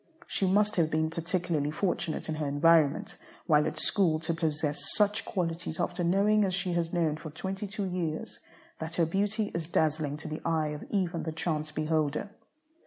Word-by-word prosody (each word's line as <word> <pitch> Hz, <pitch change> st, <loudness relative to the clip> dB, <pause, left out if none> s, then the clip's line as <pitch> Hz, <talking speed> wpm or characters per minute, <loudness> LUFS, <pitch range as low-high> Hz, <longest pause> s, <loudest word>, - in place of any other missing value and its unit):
She 195 Hz, -, 0 dB
must 205 Hz, +2 st, +3 dB
have 165 Hz, -3 st, +3 dB
been 160 Hz, 0 st, 0 dB
particularly 165 Hz, -3 st, -1 dB
fortunate 175 Hz, 0 st, -1 dB
in 160 Hz, -, -1 dB
her 150 Hz, -, 0 dB
environment 155 Hz, +1 st, +3 dB, 0.3 s
while 150 Hz, -2 st, +4 dB
at -, -, -4 dB
school 170 Hz, -6 st, +2 dB
to 165 Hz, +1 st, 0 dB
possess 155 Hz, -2 st, -1 dB
such 210 Hz, 0 st, +2 dB
qualities 165 Hz, -3 st, -3 dB
after 175 Hz, 0 st, -1 dB
knowing 200 Hz, +4 st, +4 dB
as 185 Hz, -2 st, +1 dB
she 185 Hz, -2 st, -1 dB
has 170 Hz, -1 st, 0 dB
known 160 Hz, -3 st, +1 dB
for 155 Hz, 0 st, -7 dB
twenty 190 Hz, +6 st, -4 dB
two 205 Hz, 0 st, -3 dB
years 175 Hz, -4 st, -3 dB, 0.4 s
that 160 Hz, +1 st, -5 dB
her 170 Hz, -, +3 dB
beauty 205 Hz, +5 st, 0 dB
is 165 Hz, -2 st, -3 dB
dazzling 155 Hz, -3 st, +1 dB
to 160 Hz, -, -8 dB
the 155 Hz, 0 st, -5 dB
eye 160 Hz, -2 st, +1 dB
of 150 Hz, 0 st, -6 dB
even 180 Hz, -4 st, 0 dB
the 160 Hz, -, -3 dB
chance 155 Hz, -1 st, -2 dB
beholder. 155 Hz, +4 st, 0 dB
165 Hz, 180 wpm, -29 LUFS, 155-185 Hz, 0.4 s, while